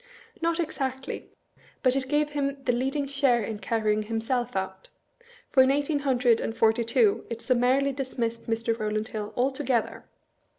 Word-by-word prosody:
Not 335 +1 +1
exactly, 265 -4 -3 0.5
but 255 -1 +4
it 265 -1 -1
gave 295 +1 +1
him 280 -1 -2
the 250 - +2
leading 270 +4 -1
share 270 -4 +2
in 215 0 -4
carrying 215 -2 0
himself 230 +2 -2
out: 190 0 -4 0.6
for 265 - +6
in 260 - +5
eighteen 285 +2 +1
hundred 250 -4 +3
and 225 - -3
forty 225 +1 +3
two 230 -3 +2
it 230 -1 -4
summarily 255 +3 +2
dismissed 245 -4 -3
Mr. 230 0 0
Row 215 0 -1
land 215 +2 -2
Hill 210 -1 -5
altogether! 260 -1 0
250 Hz, 160 wpm, -27 LUFS, 225-275 Hz, 0.6 s, for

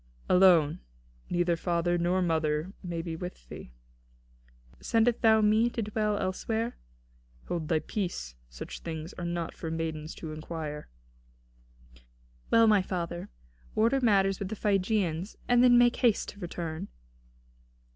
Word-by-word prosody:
"Alone; 180 -5 +5 0.5
neither 175 -1 +1
father 175 +1 0
nor 175 +2 +1
mother 160 +1 0
may 170 -3 -4
be 165 -1 -4
with 170 - -8
thee." - - -9 1.1
"Sendest 230 0 +2
thou 220 -1 +5
me 215 +3 +4
to 230 -1 -3
dwell 210 0 -1
elsewhere?" 220 +5 -2 0.7
"Hold 165 -3 -2
thy 160 - +2
peace: 175 - -4 0.2
such - - -8
things 160 0 -6
are 175 - -4
not 170 -1 -3
for 165 - -6
maidens 160 -1 -4
to 160 - -7
inquire." 155 - -6 1.6
"Well, 230 0 +6
my 210 -3 +5
father, 175 -2 -4 0.5
order 230 +5 +3
matters 195 -4 +3
with 195 - -4
the 220 - -4
Phrygians, 195 -3 0
and 245 0 +5
then 245 -1 +7
make 240 0 +4
haste 235 -5 +2
to 205 - -11
return." 170 -3 -5
180 Hz, 135 wpm, -29 LUFS, 165-215 Hz, 1.6 s, then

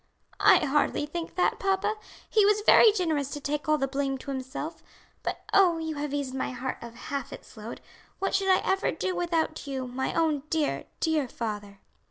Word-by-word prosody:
"I - - +6
hardly 295 +1 +1
think 330 +3 -6
that, 360 - +1
papa; 390 +2 +1 0.3
he 430 - +4
was 420 +1 +4
very 445 - +8
generous 320 -9 0
to 290 - -5
take 295 +1 -3
all 305 - +4
the 270 - 0
blame 270 0 -1
to 275 - -7
himself; 265 +5 -5 0.4
but - - -4
oh, 365 -4 +5
you 320 -1 -3
have 290 -1 -3
eased 280 -2 -2
my 265 - -2
heart 255 +1 -4
of 235 0 -9
half 275 +2 -5
its - - -11
load. 220 +1 -8 0.4
What 390 - -1
should 390 0 +2
I 375 - +5
ever 385 +1 +1
do 370 - -2
without 330 -4 -1
you, 265 -2 -3
my 255 +1 -3
own 315 -4 +2
dear, 315 -3 0 0.2
dear 315 -4 +1
father!" 205 -4 -5
295 Hz, 195 wpm, -28 LUFS, 265-345 Hz, 0.4 s, very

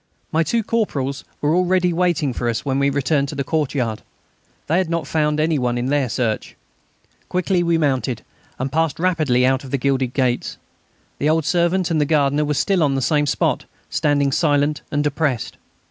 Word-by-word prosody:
My 160 - +2
two 225 +9 0
corporals 140 - -1 0.2
were 150 +1 +2
already 180 0 +2
waiting 165 -6 +1
for 120 0 -2
us 115 +3 -2
when 135 -1 0
we 140 0 +3
returned 140 +1 +1
to 145 - -6
the 140 - -1
courtyard. 135 -7 -1 0.6
They 165 +4 +2
had 185 -3 -1
not 170 -3 -1
found 150 0 0
any 155 -1 +1
one 120 -1 0
in 120 - -2
their 140 -3 +1
search. 110 -1 -2 0.7
Quickly 180 0 +1
we 170 -1 +2
mounted, 130 -6 0 0.3
and 130 +1 -3
passed 160 0 0
rapidly 155 -9 +2
out 130 0 +2
by 135 - -10
the 140 - 0
gilded 130 -1 0
gates. 125 -3 0 0.6
The 150 - +1
old 160 -1 +2
servant 175 +1 +1
and 155 -2 +2
the - - +3
gardener 145 0 +2
were 150 0 -1
still 190 +4 +1
on 140 -3 +2
the 135 - 0
same 150 +2 +2
spot, - - 0 0.3
standing 145 -2 +1
silent 145 0 +1
and 145 0 0
depressed. 145 -4 -1
145 Hz, 190 wpm, -20 LUFS, 135-165 Hz, 0.7 s, we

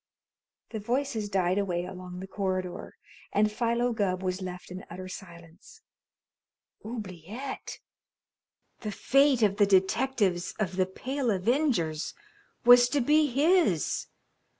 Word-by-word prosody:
The 220 - -4
voices 235 -1 -1
died 185 -1 +1
away 180 -3 -1
along 180 0 -8
the 190 - -7
corridor, 185 -2 -3 0.3
and 210 +1 +2
Philo 235 +2 0
Gubb 190 -4 -1
was 185 +1 -2
left 180 -1 -7
in 185 +1 -7
utter 185 +2 -7
silence. 170 -2 -12 1.0
Oubliette! 215 - -6 1.0
The 215 - -4
fate 270 +3 +3
of 200 -1 +3
the 205 -1 +5
detectives 195 -1 +1
of 190 -4 -2
"The 185 -1 +2
Pale 260 +6 -3
Avengers" 195 - 0 0.5
was 245 0 +8
to 285 - +1
be 300 +4 +4
his! 285 - +2
200 Hz, 120 wpm, -28 LUFS, 185-245 Hz, 1.0 s, was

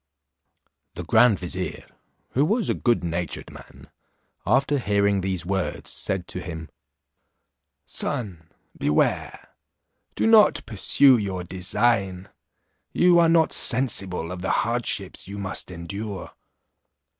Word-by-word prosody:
The - - -6
grand 120 -5 +4
vizier, 90 +1 -5 0.5
who 135 - +2
was 215 +8 +1
a - - +1
good 120 -6 0
natured 85 -1 -4
man, - - -15 0.6
after 135 +5 +2
hearing 100 -3 +1
these 95 -2 -3
words, 95 0 -3
said 95 -2 -3
to 90 - -5
him, 80 -3 -8 1.2
"Son, 85 -8 -5 0.3
beware; 75 - -1 0.7
do - - 0
not 225 -1 +5
pursue 120 +5 +4
your 95 -4 -4
design; 95 +1 -1 0.6
you 175 -1 +4
are 165 -1 +4
not 165 -1 +3
sensible 100 -9 +2
of 90 -1 -7
the 95 - -3 0.2
hardships 115 -6 -2
you 100 +1 -7
must 95 -2 -5
endure. 95 +3 -7
100 Hz, 115 wpm, -24 LUFS, 90-120 Hz, 1.2 s, not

